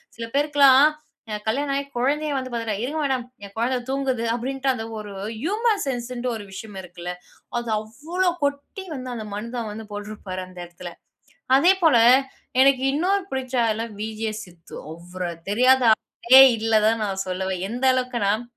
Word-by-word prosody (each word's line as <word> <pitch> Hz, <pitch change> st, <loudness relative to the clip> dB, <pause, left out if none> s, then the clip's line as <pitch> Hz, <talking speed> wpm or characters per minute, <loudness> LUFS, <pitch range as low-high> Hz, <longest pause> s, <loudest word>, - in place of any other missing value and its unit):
சில 230 Hz, -, -5 dB
பேருக்கெல்லாம் 285 Hz, -2 st, +6 dB, 0.6 s
கல்யாணம் 275 Hz, +5 st, 0 dB
ஆகி 280 Hz, 0 st, -1 dB
குழந்தையை 290 Hz, +4 st, 0 dB
வந்து 260 Hz, -1 st, -4 dB
பார்த்துட்டா 230 Hz, -3 st, -2 dB
இருங்க 285 Hz, +6 st, -3 dB
மேடம் 265 Hz, -3 st, 0 dB, 0.2 s
என் 200 Hz, 0 st, -10 dB
குழந்தை 245 Hz, +3 st, +1 dB
தூங்குது 265 Hz, -3 st, -1 dB
அப்படின்ட்டு 265 Hz, +3 st, -2 dB
அந்த 225 Hz, -3 st, -5 dB
ஒரு 210 Hz, -1 st, -7 dB, 0.3 s
ஹியூமர் 425 Hz, +4 st, +1 dB
சென்ஸ்ன்ட்டு 250 Hz, -1 st, -3 dB
ஒரு 215 Hz, -, -6 dB
விஷயம் 205 Hz, +1 st, -9 dB
இருக்குல்ல, 175 Hz, 0 st, -7 dB, 0.5 s
அது 240 Hz, -1 st, -6 dB
அவ்வளோ 310 Hz, +12 st, -2 dB
கொட்டி 285 Hz, +7 st, -3 dB
வந்து 255 Hz, -1 st, -6 dB
அந்த 220 Hz, -2 st, -6 dB
மனிதன் 230 Hz, +1 st, -4 dB
வந்து 220 Hz, +1 st, -8 dB
போட்டிருப்பாரு 205 Hz, -2 st, -6 dB
அந்த 185 Hz, -1 st, -13 dB
இடத்துல. 175 Hz, 0 st, -9 dB, 0.7 s
அதேபோல 345 Hz, -2 st, +4 dB, 0.6 s
எனக்கு 265 Hz, -1 st, +5 dB
இன்னொரு 375 Hz, +7 st, +1 dB
பிடிச்ச 260 Hz, -1 st, -4 dB
ஆளு 220 Hz, +1 st, -1 dB
வி.ஜே 220 Hz, +1 st, -3 dB
சித்து 175 Hz, -3 st, -14 dB, 0.2 s
அவர 175 Hz, +2 st, -9 dB, 0.3 s
தெரியாத 255 Hz, +5 st, +4 dB
ஆளே 255 Hz, +4 st, +5 dB, 0.2 s
இல்ல 225 Hz, 0 st, 0 dB
தான் 225 Hz, +1 st, +2 dB
நான் 195 Hz, -2 st, -2 dB
சொல்லுவேன். 185 Hz, 0 st, -2 dB
எந்த 245 Hz, +4 st, -4 dB
அளவுக்கு 255 Hz, -1 st, -1 dB
நான், 210 Hz, +3 st, +1 dB
240 Hz, 150 wpm, -23 LUFS, 210-275 Hz, 0.7 s, பேருக்கெல்லாம்